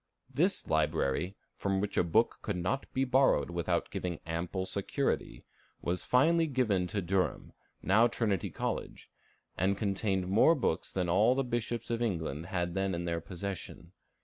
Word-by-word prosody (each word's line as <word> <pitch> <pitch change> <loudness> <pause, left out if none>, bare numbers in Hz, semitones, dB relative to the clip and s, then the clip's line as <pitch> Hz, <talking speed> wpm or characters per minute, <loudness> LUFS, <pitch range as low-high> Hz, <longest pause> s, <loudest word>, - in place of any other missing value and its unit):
This - - +1
library, 90 +8 0 0.2
from 95 -1 -1
which 100 +1 -2
a - - +4
book 110 +7 +2
could 100 - -2
not 90 +10 -2
be 130 - +1
borrowed 130 -6 +3
without 85 -1 -1
giving 85 -3 -3
ample 85 +3 -3
security, 100 +1 -2 0.3
was 90 +1 -2
finally 165 +6 +3
given 110 -10 +1
to 100 +2 -2
Durham, 90 +1 -1 0.3
now 110 +5 +5
Trinity 105 -6 -1
College, - - -4 0.5
and 95 +2 +2
contained 95 -2 0
more 110 - +5
books 95 - -1
than 90 -2 -1
all 105 +8 +4
the 135 - +1
bishops 120 -1 -3
of 115 0 -1
England 85 -7 -2
had 90 -2 -2
then 95 -1 0
in 85 0 -3
their 85 -1 -1
possession. 90 -1 -7
95 Hz, 155 wpm, -31 LUFS, 90-115 Hz, 0.5 s, now